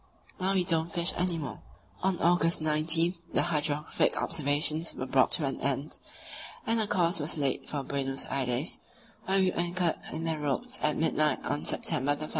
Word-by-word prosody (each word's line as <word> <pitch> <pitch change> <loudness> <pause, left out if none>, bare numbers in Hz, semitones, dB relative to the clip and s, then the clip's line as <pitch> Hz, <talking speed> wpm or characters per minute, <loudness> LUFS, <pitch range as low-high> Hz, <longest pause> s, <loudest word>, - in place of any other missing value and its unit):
Now 190 +1 0
we 185 - +3
don't 165 -1 +1
fish 170 +2 +1
any 175 -1 0
more. 145 -4 -6 0.4
On 190 -1 +1
August 170 0 +3
19 155 +2 +2 0.2
the - - +3
hydrographic 150 -2 0
observations 150 +2 +1
were 130 - -4
brought 130 0 +3
to 155 - +2
an 135 - -3
end, 140 +2 -2 0.7
and 225 0 +1
a 215 - -1
course 175 -4 +1
was 155 +3 0
laid 140 -3 -1
for 145 -2 -3
Buenos 135 0 -2
Aires, 130 +3 -1 0.5
where 190 +1 +1
we 190 -1 +3
anchored 175 -1 0
in 160 +1 -4
the 160 -2 -2
roads 240 - 0
at 150 - +1
midnight 155 -1 +1
on 145 - -2
September 145 +3 +2
1. 155 +1 -6
160 Hz, 175 wpm, -29 LUFS, 145-175 Hz, 0.7 s, we